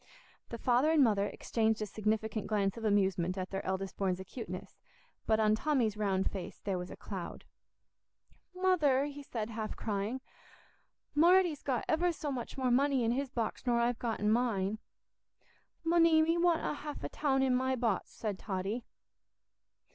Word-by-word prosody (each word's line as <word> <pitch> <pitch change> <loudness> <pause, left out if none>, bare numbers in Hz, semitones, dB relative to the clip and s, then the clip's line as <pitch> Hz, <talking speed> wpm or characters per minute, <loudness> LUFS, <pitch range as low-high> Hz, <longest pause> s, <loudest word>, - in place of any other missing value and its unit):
The 235 - -5
father 250 +5 +3
and 315 -3 +5
mother 205 -4 +2
exchanged 220 0 0
a 215 - -1
significant 215 +1 -1
glance 200 -2 +1
of 230 - -8
amusement 190 -4 +1
at 185 0 -4
their 195 0 -3
eldest 190 0 -3
born's 190 -2 0
acuteness; 190 -1 -7 0.5
but 220 0 +3
on 215 -1 +4
Tommy's 235 -3 +1
round 195 -3 0
face 190 -3 -6
there 190 -3 -1
was 180 - -6
a - - -8
cloud. 190 -4 -7 1.1
"Mother," 320 -8 +3
he 290 0 -7
said, 230 -5 -4
half 215 -1 -4
crying, 210 +4 -2 0.9
"Marty's 340 0 +4
got 255 -4 -1
ever 345 +2 +2
so 305 -3 -4
much 250 -1 -5
more 255 -2 +1
money 270 0 +3
in 230 - +2
his 270 +2 -1
box 235 +1 -3
nor 240 -1 +3
I've 240 0 +1
got 230 -2 -2
in 210 +1 +2
mine." 215 -3 +1 1.0
"Munny, 330 -1 +5
me 330 +1 +2
want 345 -1 +3 0.2
half 295 0 -7
a - - -3
toun 270 -3 +1
in 260 -1 +3
my 260 +1 +1
bots," 230 -6 0
said 205 -4 -4
Totty. 200 +4 -3
230 Hz, 165 wpm, -32 LUFS, 205-275 Hz, 1.1 s, and